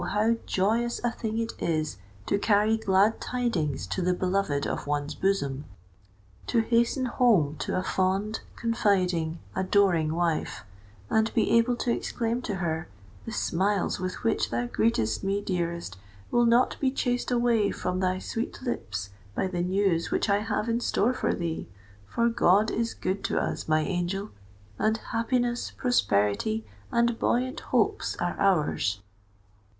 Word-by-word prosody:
how 220 +2 +3
joyous 225 +5 +1
a 240 - +1
thing 220 -1 -4
it 230 0 -2
is 155 - -1 0.3
to 200 - +1
carry 210 +1 +3
glad 205 0 +2
tidings 180 - -1
to 95 - -3
the 180 0 +1
beloved 180 -6 0
of - - -3
one's 145 0 -1
bosom,—to 100 - -4
hasten 235 +3 +2
home 220 - +3
to - - -2
a 185 - 0
fond, 195 +3 0 0.2
confiding, 185 -8 +1 0.2
adoring 185 -5 +2
wife, 165 -9 -1 0.5
and 220 0 +2
be 225 - +2
able 230 +1 +4
to 240 0 -1
exclaim 235 +1 -1
to 215 -5 -3
her, 160 -3 -2 0.4
"The - - -3
smiles 195 +2 0
with 185 0 -4
which 225 - +1
thou 120 +1 -1
greetest 115 - 0
me, 195 +1 0
dearest, 170 - -3 0.3
will 240 0 +4
not 235 +2 +3
be 270 - +2
chased 245 -2 -1
away 235 -4 +2
from 180 0 -2
thy 185 0 +1
sweet 225 +4 -4
lips 100 - -4 0.2
by - - 0
the 180 -2 -2
news 180 -2 +1
which 205 - +1
I 200 - +3
have 210 0 -2
in 230 0 +1
store 240 0 +1
for - - 0
thee! 170 -2 -3 0.4
For 235 - +1
God 210 -2 +3
is 230 0 -1
good 190 +2 -2
to - - +1
us, - - -3
my 155 0 +3
angel—and 175 - -3
happiness, 240 +1 0
prosperity, 220 - +1 0.3
and 235 -1 +2
buoyant 255 +4 0
hopes - - 0
are - - -2
ours! 150 - +2
195 Hz, 145 wpm, -27 LUFS, 160-230 Hz, 0.5 s, able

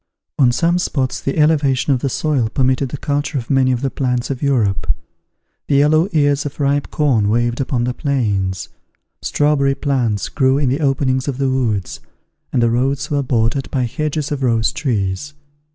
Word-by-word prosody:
On 125 -3 +5
some 170 +7 +1
spots 135 -7 -1
the 135 - -2
elevation 145 -3 +2
of 130 - 0
the 135 - -1
soil 135 -4 0
permitted 130 +2 +1
the 145 - -5
culture 145 +1 -2
of 120 0 -4
many 130 -1 +3
of 125 -1 -1
the 135 -2 -1
plants 125 -1 -1
of 130 - -5
Europe: 120 - +1 0.8
the 140 - +1
yellow 155 +5 +4
ears 145 -2 +2
of 145 0 -7
ripe 140 0 0
corn 125 -9 +1
waved 120 +2 0
upon 125 -2 -1
the 125 +1 -1
plains; 105 - -1 0.5
strawberry 145 -2 +1
plants 130 -7 -1
grew 135 -1 +2
in 140 -3 +1
the 135 +4 0
openings 135 -2 +1
of 135 -3 -2
the 135 -1 0
woods, 110 -8 -1 0.5
and 120 - +1
the 115 - +3
roads 135 +5 -1
were 145 -1 +1
bordered 125 0 0
by 130 -3 -1
hedges 150 +4 -2
of 145 -2 -2
rose 115 -3 +2
trees. 115 0 -2
135 Hz, 180 wpm, -18 LUFS, 120-145 Hz, 0.8 s, On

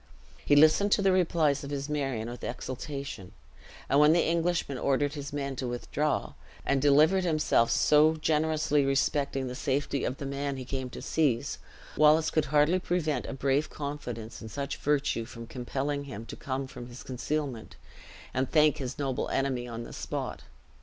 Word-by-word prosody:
He 145 - +4
listened 155 +7 +5
to 200 - +2
the 195 - +4
replies 165 -6 +2
of 140 - -6
his 140 -1 -3
Marion 135 -7 -2
with 120 0 -8
exultation; 130 -5 -6 0.5
and 140 - +3
when 150 +1 +7
the 170 - +3
Englishman 165 -5 0
ordered 140 +1 +1
his 145 -2 -6
men 140 -2 -3
to 130 - -3
withdraw, 145 +5 -2 0.3
and 140 -1 +2
delivered 155 +7 +5
himself 155 -8 +2
so 155 +2 +4
generously 155 -1 +1
respecting 135 0 0
the 125 - -4
safety 140 +1 -1
of 130 - -2
the 140 - -6
man 140 0 -3
he 130 - -6
came 130 0 -4
to - - -9
seize, 140 -8 0 0.4
Wallace 155 +1 +5
could 155 -2 +1
hardly 150 +5 +3
prevent 175 -4 -1
a - - -4
brave 135 +3 0
confidence 125 -6 -6
in 110 - -8
such 140 +5 -4
virtue 145 -5 0
from 115 0 -9
compelling 135 +4 -3
him 115 -5 -7
to - - -8
come 135 -1 -3
from 120 -2 -9
his 120 +1 -10
concealment, 130 -2 -4 0.6
and 130 0 0
thank 150 -2 +4
his 130 -2 -5
noble 135 -3 -2
enemy 130 -3 -1
on 115 -1 -6
the - - -10
spot. - - -4
140 Hz, 175 wpm, -29 LUFS, 130-150 Hz, 0.6 s, when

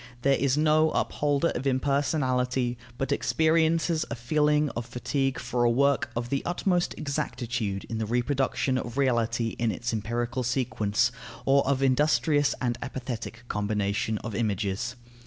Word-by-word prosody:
There 140 - +4
is 135 0 +1
no 155 +1 +4
upholder 145 +2 +1
of 135 +3 -3
impersonality 130 -2 +1 0.2
but 135 - -2
experiences 160 +2 +2
a - - -3
feeling 150 +4 +2
of 120 0 -5
fatigue 135 +2 -1
for 125 -1 -1
a 120 - +4
work 140 +3 +2
of 120 +1 -3
the 140 +1 0
utmost 175 0 0
exactitude 120 -8 -3
in 115 - -5
the 110 - -2
reproduction 130 +2 0
of 120 +1 -6
reality 120 -3 +1
in 115 -1 +1
its 120 +2 -3
empirical 120 +3 -2
sequence, 120 -3 +1 0.3
or 140 +1 +4
of 135 -1 +1
industrious 145 +2 +3
and 120 -2 -1
apathetic 120 -3 -5
combination 105 0 -1
of 110 - -5
images. 105 +2 -1
125 Hz, 140 wpm, -27 LUFS, 115-140 Hz, 0.3 s, There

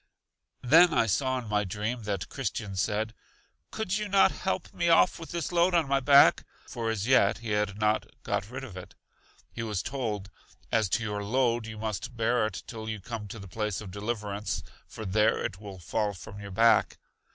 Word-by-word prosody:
Then 165 +6 +6
I - - +4
saw 130 +5 +1
in 120 -3 -5
my 105 0 +1
dream 105 +5 -3
that 100 -3 -2
Christian 105 -6 -4
said: 110 +3 -1 0.6
Could 215 -2 -2
you 210 - -3
not 195 0 +5
help 190 -1 -3
me 170 0 0
off 165 +2 +4
with 165 - -8
this 170 -2 -3
load 175 +1 +3
on 165 -4 +3
my 135 0 +2
back? 140 +1 +6 0.2
for 115 -1 -3
as 110 -2 -1
yet 115 -5 +4
he 115 -2 -6
had 105 -1 0
not 105 0 +1 0.2
got 100 0 -2
rid 130 +2 -6
of 115 -8 -9
it. 90 - -10 0.6
He - - -6
was 105 -4 -2
told: 110 -8 -3 0.4
As 110 -4 +2
to 115 +4 0
your 105 -1 -3
load, 120 +1 +1
you 110 -1 -7
must 110 +2 -4
bear 115 0 +2
it 100 - -7
till 110 -2 -7
you 110 -1 -4
come 110 +1 -6
to 110 - -8
the 100 -2 -9
place 105 0 -3
of 100 -4 -8
Deliverance, 105 0 -3 0.2
for 110 - -8
there 105 +3 +3
it 95 - -4
will 100 -3 -8
fall 100 +3 -2
from 100 +3 -10
your 100 -1 -8
back. 110 +3 +3
110 Hz, 200 wpm, -28 LUFS, 105-125 Hz, 0.6 s, Then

